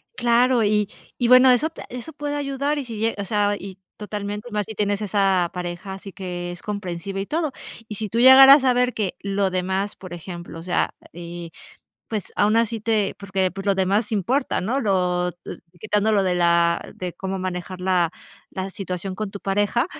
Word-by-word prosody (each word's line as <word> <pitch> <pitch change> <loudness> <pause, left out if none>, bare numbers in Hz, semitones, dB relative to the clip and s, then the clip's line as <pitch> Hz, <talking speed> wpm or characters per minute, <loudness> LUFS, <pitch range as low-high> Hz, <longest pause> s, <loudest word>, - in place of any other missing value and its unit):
Claro, 240 0 +3
y 210 -1 +2 0.3
y 245 - +1
bueno, 255 +1 +8
eso 250 +6 +3
te 325 - -10
eso 250 +6 -7
puede 290 0 -4
ayudar, 285 +1 -1
y 275 - -5
si 230 -3 -7
lle 225 +1 0
o 200 - -2
sea, 205 0 +1
y 195 -1 -9 0.2
totalmente 210 +1 -5
más 210 -1 -1
si 220 - -6
tienes 205 0 0
esa 195 -4 +2
pareja, 180 +2 -5
así 195 +1 -9
que 180 -2 -5
es 175 - -9
comprensiva 195 -1 -4
y 195 - -2
todo. 310 +4 -1 0.4
Y 210 - -6
si 215 0 -4
tú 230 - -1
llegaras 270 +2 +9
a 255 -1 +4
ver 250 0 +2
que, 200 -4 -2
lo 200 0 0
demás 190 +2 -1
por 185 -2 -10
ejemplo, 175 -1 -8
o - - -9
sea, 180 0 0 0.2
eh, 170 0 -8 0.6
pues 215 -3 -4
aún 210 +2 +3
así 230 -1 +1
te 215 -2 0
porque, 190 -2 -1
pues, 195 +2 -8
lo 200 - +3
demás 195 +3 +1
importa, 230 +8 0
¿no? 240 +9 -1
Lo 180 -5 +1
eh, 175 - -10 0.2
quitando 210 +1 +1
lo 200 -2 +3
de 185 -2 +1
la 170 -1 +2
de 180 -1 -5
cómo 190 +1 -4
manejar 185 0 -5
la, 180 -2 +2 0.4
la 190 +1 -4
situación 185 0 -5
con 215 +1 -4
tu 200 - -8
pareja. 205 +6 +1
200 Hz, 200 wpm, -23 LUFS, 185-225 Hz, 0.6 s, llegaras